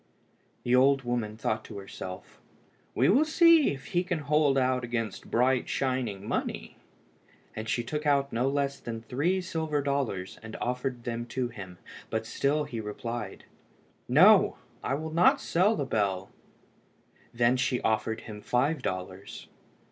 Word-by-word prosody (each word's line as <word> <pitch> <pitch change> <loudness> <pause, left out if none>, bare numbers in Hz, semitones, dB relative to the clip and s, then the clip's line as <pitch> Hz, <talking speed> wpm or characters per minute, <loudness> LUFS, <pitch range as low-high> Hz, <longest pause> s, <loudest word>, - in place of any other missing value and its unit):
The 125 +1 +3
old 135 +1 +4
woman 120 -3 -2
thought 110 0 -1
to - - -9
herself 95 -1 -9 0.5
"We - - +3
will 260 +10 +5
see 325 0 +5
if 135 -1 -7
he 175 0 +2
can 180 -2 -2
hold 150 -1 +2
out 130 -1 +1
against 115 -4 -4
bright 125 +1 +2
shining 125 -7 -2
money," - - -3 0.8
and 110 +1 -5
she 120 - 0
took 150 +5 -3
out 140 -1 +2
no 125 +4 +1
less 140 0 -1
than 115 -1 -6
three 165 +11 0
silver 160 -4 -2
dollars 135 -10 -2
and 110 0 -9
offered 125 0 -3
them 120 0 -4
to 125 0 -2
him, 95 -6 -9 0.3
but 110 0 -2
he - - -9
still 145 +2 +1
replied 115 -3 -5 0.7
"No, - - +6 0.3
I 135 - 0
will 160 +2 -5
not 170 +2 +5
sell 195 +6 +2
the 145 - -2
bell." 100 -6 -1 1.1
She 125 +2 +2
then - - -7
offered 110 0 0
him 105 -2 -9
five 135 +6 0
dollars. 95 -1 -6
125 Hz, 150 wpm, -28 LUFS, 110-145 Hz, 1.1 s, No